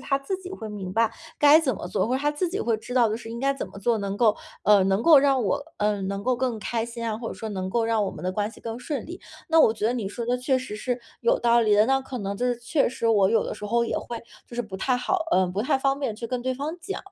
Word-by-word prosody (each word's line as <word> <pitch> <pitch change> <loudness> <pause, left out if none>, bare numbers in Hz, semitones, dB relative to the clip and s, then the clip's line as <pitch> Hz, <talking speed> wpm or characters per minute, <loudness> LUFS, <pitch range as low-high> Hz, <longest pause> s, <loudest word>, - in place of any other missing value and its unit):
他 275 - 0
自 275 +8 -4
己 370 -1 -9
会 220 - -7
明 195 -3 -6
白， 225 +3 +2 0.3
该 295 +2 +7
怎 260 -7 0
么 175 - -6
做， 185 +5 -1
或 255 - +1
者 - - -2
他 295 +2 +1
自 330 +4 -1
己 395 +4 -3
会 230 - +1
知 245 +3 -8
道 235 -4 +4
就 - - 0
是 225 -1 -10
应 230 +1 -6
该 275 +2 +1
怎 275 - -5
么 - - -11
做 225 +3 +1
能 200 0 -3
够， 215 -1 +4 0.3
嗯， 200 -2 +5
能 195 +3 +1
够 315 0 +8
让 270 -3 +3
我， 245 - 0
嗯， 205 -2 0
能 200 0 -3
够 255 0 +2
更 245 -3 -1
开 230 +2 -2
心 235 0 -5
啊， 220 -1 -2
或 230 -1 -5
者 - - -6
说 220 - -6
能 185 -2 -3
够 230 +4 +1
让 225 -1 +1
我 - - -2
们 - - -9
的 185 - -1
关 210 +2 -1
系 - - -15
更 230 0 -6
顺 265 +3 -4
利。 350 +3 -9 0.3
那 325 -1 +6
我 225 - +6
觉 220 -1 -4
得 235 - +2
你 225 -6 -3
说 235 +3 -5
的 245 +1 0
确 260 +1 +1
实 255 -5 -6
是 245 +3 -2 0.2
有 - - +2
道 235 0 +4
理 215 -2 +3
的， 210 +1 +5
那 270 +2 +2
可 265 -1 -7
能 200 -3 -3
就 245 +5 -1
是 245 -1 0
确 275 +5 +1
实 235 -1 -3
我 205 -4 +4
有 225 0 +2
的 - - -4
时 210 - -7
候 235 +2 +2
也 - - -1
会， 235 - -6 0.3
就 240 - -11
是 240 - 0
不 195 -3 -8
太 250 +5 +1
好， 370 +10 0
嗯， 185 -1 +3
不 195 - -1
太 255 - +2
方 275 +1 0
便 230 -7 -2
去 230 - -5
跟 250 0 -3
对 255 +1 -1
方 290 +5 -4
讲， 390 +3 -5
235 Hz, 335 characters per minute, -25 LUFS, 210-265 Hz, 0.3 s, 够